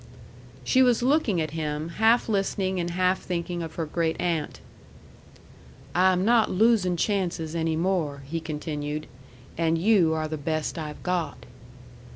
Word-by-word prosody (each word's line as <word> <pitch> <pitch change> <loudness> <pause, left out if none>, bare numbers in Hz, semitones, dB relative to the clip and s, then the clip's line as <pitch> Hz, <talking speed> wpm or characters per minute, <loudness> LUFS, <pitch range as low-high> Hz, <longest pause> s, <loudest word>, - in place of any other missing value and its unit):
She 255 - +3
was 245 -2 +3
looking 255 - +2
at 155 -2 -2
him, 155 0 -3
half 225 +7 +3
listening 195 -3 0
and 175 0 -2
half 185 +2 +1
thinking 175 -1 -3
of 165 -1 -6
her 165 - -2
great 160 +1 -1
aunt. 165 -4 -2 1.3
"I 185 +1 +4
am 185 +1 +1
not 230 -1 +4
losing 200 -3 +3
chances 175 -5 -1
any 165 -1 0
more," 160 -5 -1
he 165 +4 -3
continued. 150 -1 -4 0.5
"And 165 0 +2
you 175 -3 +3
are 155 0 -2
the 155 0 -4
best 155 +2 -2
I've 150 -1 -7
got." 175 -5 -2
170 Hz, 150 wpm, -26 LUFS, 155-190 Hz, 1.3 s, I